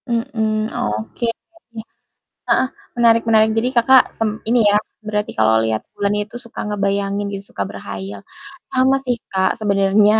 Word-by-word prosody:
Mhm, 220 -3 -1
oke. 110 - -3 1.2
Heeh, 260 - +3 0.3
menarik-menarik. 225 -2 +4
Jadi 235 +3 +1
Kakak 255 +2 +7 0.2
sem 220 -1 -1
ini 240 +1 +4
ya, 205 - +4 0.3
berarti 210 -1 -2
kalau 110 0 +4
lihat 110 -1 -1
bulan 200 0 0
itu 210 +3 -4
suka 235 -2 -8
ngebayangin 200 0 -1
gitu, 195 0 -6
suka 100 - -2
berkhayal. 100 0 -7 0.5
Sama 260 +1 +3
sih 250 -2 0 0.2
Kak 190 0 +1
sebenarnya, 205 +1 +3
210 Hz, 135 wpm, -19 LUFS, 195-230 Hz, 1.2 s, Kakak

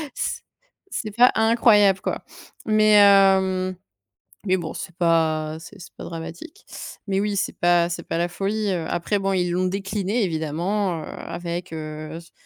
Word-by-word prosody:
C - - -3 0.5
c'est 215 - -3
pas 245 +2 +6
incroyable, 220 -3 +4
quoi. - - -3 0.4
Mais 215 -1 +4
heu, 190 -2 +4 0.7
mais 185 0 +3
bon, 165 -3 -5
c'est 175 -2 -8
pas 160 -3 +1
c'est 165 - -13
c'est - - -12
pas - - -9
dramatique. 170 - -9 0.4
Mais 195 0 0
oui, 205 0 -1
c'est - - -2
pas 175 -1 +3
c'est 170 0 -4
pas 165 - -3
la 175 - +1
folie, 200 +3 -2
heu. 170 -3 -2
Après, 200 +4 -1
bon, 195 0 0
ils 180 -2 0
l'ont 185 +1 +1
décliné 195 +3 -1
évidemment, 170 +2 -2
heu, - - -8
avec, 175 0 -6
heu, 155 0 -6
s 170 0 -13
185 Hz, 165 wpm, -23 LUFS, 170-200 Hz, 0.7 s, pas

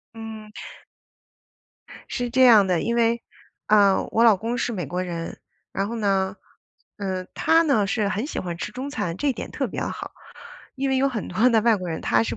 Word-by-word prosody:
嗯。 220 -1 -8 1.6
是 245 -1 -2
这 260 +2 +3
样 225 -5 +7
的， 180 -3 +1
因 235 - -1
为， 235 0 +2 0.5
呃， 200 -2 +4
我 230 - +3
老 225 -3 +7
公 230 +5 -3
是 245 - -1
美 180 -6 -3
国 180 +6 -3
人。 170 -2 -6 0.3
然 195 +1 -2
后 235 - -4
呢， 195 -2 0 0.6
呃， 190 -2 -3
他 325 +1 +3
呢， 275 -10 +2
是 205 +1 0
很 210 +4 -2
喜 300 - -4
欢 175 -2 -5
吃 - - -5
中 260 +3 -5
餐， 175 - -3
这 285 +2 0
点 - - -7
特 - - -2
别 - - -5
好。 - - -5 0.7
因 270 +1 -1
为 265 - +1
有 270 +1 +3
很 235 -6 -4
多 215 +8 +3
的 225 -2 +4
外 230 -1 +4
国 185 -2 -6
人， 160 - -4
他 115 -1 +2
是 115 0 -3
215 Hz, 215 characters per minute, -24 LUFS, 190-240 Hz, 1.6 s, 样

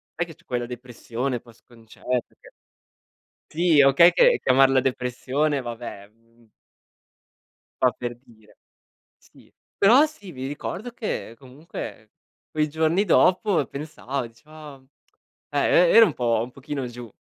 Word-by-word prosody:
sai 175 - -1
che 165 - -12
c'è - - -28
quella 120 -1 -3
depressione 125 0 -5
post 120 -1 -20
concerto 120 +1 -5
che - - -17 1.0
Sì, 165 -2 +3
okay 140 +6 +6
che - - +4
chiamarla 135 0 +4
depressione 135 +3 -1
vabbè, 120 -4 -8
mhmm 115 +1 -29 1.3
fa 125 - +5
per 120 -1 -6
dire 110 -2 -22 0.6
Sì. - - -23 0.3
Però 240 +9 +6
sì, 210 - -11
mi 130 -2 -7
ricordo 195 - -6
che 210 - -5
comunque 130 -5 -10 0.4
quei 155 0 0
giorni 160 +6 +1
dopo 185 -2 +3
pensava, 140 -3 -5
dicevo: 115 +7 -23 1.0
"ah" 145 -1 0
e 175 -1 +4
e - - +3
era 230 - +9
un 170 - -2
po' 115 -3 0
un 125 - -8
pochino 135 0 -6
giù. 120 -1 -10
135 Hz, 135 wpm, -24 LUFS, 120-160 Hz, 1.3 s, era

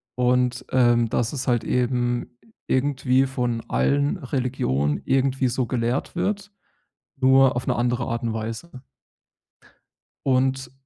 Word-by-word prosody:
Und, 125 0 +1
ähm, 120 -2 +3
dass 120 +3 -1
es 135 -2 -4
halt 120 -2 +2
eben 120 -1 -1 0.3
irgendwie 130 -1 +2
von 125 -3 -2
allen 145 +6 +1
Religionen 125 - -1
irgendwie 135 0 +1
so 125 +1 -1
gelehrt 120 +4 -2
wird, 200 +3 -2 0.7
nur 130 -1 +4
auf 125 - -3
'ne - - +1
andere 120 0 0
Art 115 +1 -3
und 115 -1 -1
Weise. 115 +6 -6 1.4
Und 130 -1 +1
125 Hz, 120 wpm, -23 LUFS, 120-135 Hz, 1.4 s, nur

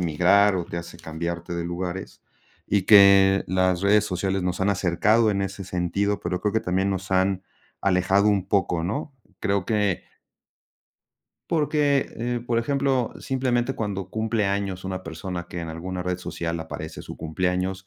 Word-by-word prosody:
migrar 90 +5 +4
o 90 - -2
te 85 - -5
hace 85 0 -9
cambiarte 85 +1 -5
de 85 - -3
lugares 90 +2 -5 0.5
y 100 -1 +2
que 100 -1 +7
las 95 0 +1
redes 105 +2 +4
sociales 95 0 -1
nos 90 +1 -2
han 100 +1 +2
acercado 105 +5 +2
en 100 -1 0
ese 95 0 -4
sentido, 95 +3 -1
pero 90 +1 -3
creo 105 - 0
que 110 - +3
también 95 +1 0
nos 95 0 -3
han 95 0 +1 0.4
alejado 95 +1 +2
un 100 -2 +1
poco, 95 -5 +1
¿no? 135 - -3 0.2
Creo 100 -2 0
que 105 -4 0 1.5
Porque, 150 -3 +2
eh, 120 +1 -2
por 115 -1 +1
ejemplo, 135 0 0
simplemente 130 -1 0
cuando 100 -4 -3
cumple 110 -1 -1
años 100 -2 -2
una 95 -1 -4
persona 85 +1 -6
que 85 - -6
en 85 - -5
alguna 90 +3 -5
red 90 0 -1
social 85 -2 -4
aparece 80 0 -7
su - - -9
cumpleaños 90 +3 -2
95 Hz, 160 wpm, -24 LUFS, 90-105 Hz, 1.5 s, que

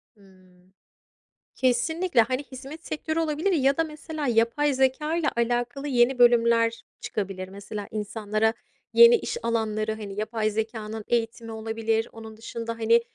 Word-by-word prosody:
Hımm. 185 -2 -23 0.8
Kesinlikle. 265 +4 +2
Hani, 255 +5 -1
hizmet 275 +4 -10
sektörü 315 +1 -2
olabilir 320 +4 0
ya 275 -5 +2
da 325 - +3
mesela 310 -1 -5
yapay 240 +5 +2
zekâyla 300 +5 +1
alakalı 245 +4 -1
yeni 250 -1 +3
bölümler 230 -1 +4 0.2
çıkabilir. 195 -2 -4
Mesela 200 +1 -7
insanlara 215 +1 -1 0.4
yeni 470 0 +9
iş 470 - -3
alanları, 220 -2 0
hani, 205 -2 -7
yapay 215 0 -1
zekânın 220 0 -4
eğitimi 230 -1 -1
olabilir. 225 0 -1
Onun 220 -1 -11
dışında, 230 +1 -5
hani, 230 +1 +4
230 Hz, 130 wpm, -26 LUFS, 220-275 Hz, 0.8 s, yeni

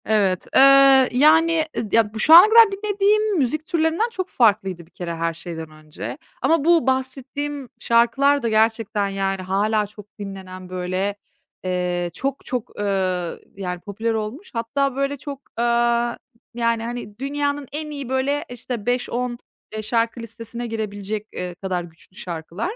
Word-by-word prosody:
Evet, 200 -4 +1
ııı, 275 -1 +7
yani, 315 +5 +4
ıd 215 - -3
ya, 220 -2 +3
bu 220 - -6
şu 310 - +5
ana 360 +6 +11
kadar 450 -2 +7
dinlediğim 410 +1 +1
müzik 305 +2 0
türlerinden 335 +6 +1
çok 380 -5 -4
farklıydı 195 - +1
bir 165 - -28
kere 170 -2 -5
her 165 0 -1
şeyden 165 -1 -7
önce 155 0 -8 0.2
ama 325 -2 +2
bu 335 -4 +4
bahsettiğim 265 +1 -2
şarkılar 260 +4 +3
da 230 - +1
gerçekten, 220 -2 +1
yani, 195 -1 -2
hâlâ 205 +3 0
çok 210 0 -13
dinlenen, 190 -2 -8
böyle, 185 +2 -2 0.5
eee, 180 -1 -1
çok 275 +1 -4
çok, 250 -4 -5
ııı, 185 -4 -1 0.2
yani, 180 -2 -4
popüler 220 +4 -3
olmuş 220 - -5
hatta, 255 +4 -1
böyle, 275 +1 -1
çok, 280 0 -7 0.2
aaa, 235 0 +1 0.4
yani, 230 -1 0
hani, 235 -3 -6
dünyanın 285 +1 -2
en 305 +1 -5
iyi, 280 -4 -6
böyle, 270 +3 0
işte, 245 -2 -6
5-10, 245 0 -1 0.4
eee, 215 - -3
şarkı 230 +2 -1
listesine 230 +1 -6
girebilecek, 215 -1 -4
eee, 180 -1 -5
kadar 180 -1 -3
güçlü 170 +2 -17
şarkılar. 175 - -5
230 Hz, 150 wpm, -22 LUFS, 195-275 Hz, 0.5 s, ana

